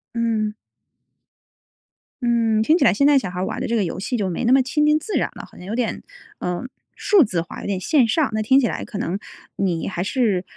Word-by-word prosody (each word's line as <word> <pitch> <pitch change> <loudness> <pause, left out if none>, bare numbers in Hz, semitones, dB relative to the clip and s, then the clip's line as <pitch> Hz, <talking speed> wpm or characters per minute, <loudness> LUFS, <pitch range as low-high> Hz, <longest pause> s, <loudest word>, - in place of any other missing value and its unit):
嗯。 225 -2 0 1.7
嗯， 230 -3 +2
听 310 +8 +4
起 295 - +1
来 210 - +5
现 280 +8 +2
在 285 -1 +6
小 195 - -5
孩 180 0 -6
儿 185 - -1
玩 - - -4
的 - - -2
这 235 - 0
个 215 - +2
游 170 - -4
戏 225 +6 -2
就 200 -4 -1
没 175 - -3
那 240 - +2
么 265 +1 +6
亲 300 +4 +1
近 300 0 +4
自 420 +7 -7
然 - - 0
了。 - - -8
好 - - -20
像 180 - -11
有 215 - -3
点， 240 -3 -2 0.4
呃， 180 +4 -3 0.3
数 400 -6 +4
字 185 -8 -1
化 - - -9
有 - - -6
点 195 -2 -1
线 260 - +3
上， 270 +2 +1
那 215 - 0
听 260 +5 +4
起 270 - +2
来 - - -4
可 210 - -7
能 195 0 -2 0.4
你 180 -4 -1
还 175 -2 -3
是， 205 -4 0
225 Hz, 260 characters per minute, -21 LUFS, 190-265 Hz, 1.7 s, 在